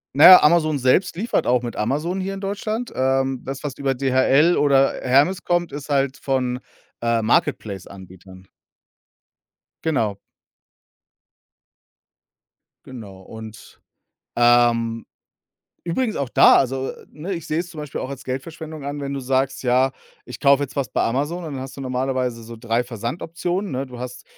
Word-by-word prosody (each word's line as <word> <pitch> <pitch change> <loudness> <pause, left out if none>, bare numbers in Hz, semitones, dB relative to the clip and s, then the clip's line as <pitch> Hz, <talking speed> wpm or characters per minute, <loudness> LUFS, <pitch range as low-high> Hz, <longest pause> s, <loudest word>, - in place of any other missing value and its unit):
Na 145 - +5
ja, 185 -1 +11
Amazon 155 -2 +3
selbst 130 +10 +2
liefert 225 +7 -1
auch 125 0 +2
mit 120 -1 -6
Amazon 150 - -1
hier 190 +1 -3
in 195 - -6
Deutschland. 215 +4 -3
Ähm, 130 0 0
das, 135 +1 -6
was 145 -3 -5
über 135 -1 0
DHL 135 +5 +3
oder 135 -2 +3
Hermes 145 +9 +2
kommt, 175 -1 0
ist 145 +1 -8
halt 140 -1 +1
von, 125 -2 -1 0.4
äh, 115 -1 +1
Marketplace-Anbietern. 95 -3 -3 1.3
Genau. 115 -11 0 2.7
Genau. 105 -7 -10
Und, 110 +2 -12 0.6
ähm, 120 -1 +3 0.8
übrigens 220 +7 -1
auch 140 -2 -2
da - - +7
also, 135 0 0 0.2
ne, 175 +6 -5
ich 165 -3 -7
sehe 155 - -1
es 175 - -6
zum 165 - -11
Beispiel 150 -2 -6
auch - - -4
als 140 -2 -8
Geldverschwendung 155 +3 -6
an, 145 +1 -4
wenn 140 0 -4
du 140 - -3
sagst: 130 +1 -1
„Ja, 130 +1 +2 0.3
ich 125 - -10
kaufe 140 0 +4
jetzt 140 - -6
was 135 -4 -1
bei - - 0
Amazon", 145 +9 -1
dann 145 -4 -5
hast 130 0 -8
du - - -8
normalerweise 130 -2 -2
so 115 +1 -10
3 115 +2 -1
Versandoptionen, 165 - -4
ne? 135 +1 -3
Du 125 -2 -11
hast, 125 0 -7
135 Hz, 155 wpm, -22 LUFS, 120-155 Hz, 2.7 s, ja